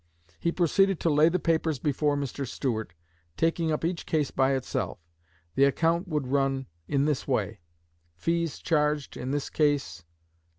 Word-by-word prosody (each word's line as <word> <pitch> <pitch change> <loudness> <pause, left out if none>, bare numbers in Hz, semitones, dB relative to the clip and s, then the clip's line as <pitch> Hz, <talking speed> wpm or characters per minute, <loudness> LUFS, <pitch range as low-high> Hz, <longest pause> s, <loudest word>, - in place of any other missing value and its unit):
He 170 - +1
proceeded 190 +2 +2
to 165 - +2
lay 150 +2 +5
the 180 - +1
papers 160 -3 +1
before 145 +2 +1
Mr. 140 -1 -3
Stuart, 110 - -3 0.4
taking 165 0 +1
up 155 +1 -1
each 170 0 -2
case 150 -3 0
by 135 0 +2
itself. 130 - -2 0.6
The 135 - +5
account 165 +6 +1
would 150 -5 -1
run 135 0 0 0.2
in 140 0 +1
this 150 -3 -1
way: - - -1 0.6
Fees 165 - -1
charged 150 -2 0
in 130 - -5
this 145 0 -2
case................ 140 - 0
150 Hz, 155 wpm, -27 LUFS, 135-165 Hz, 0.6 s, lay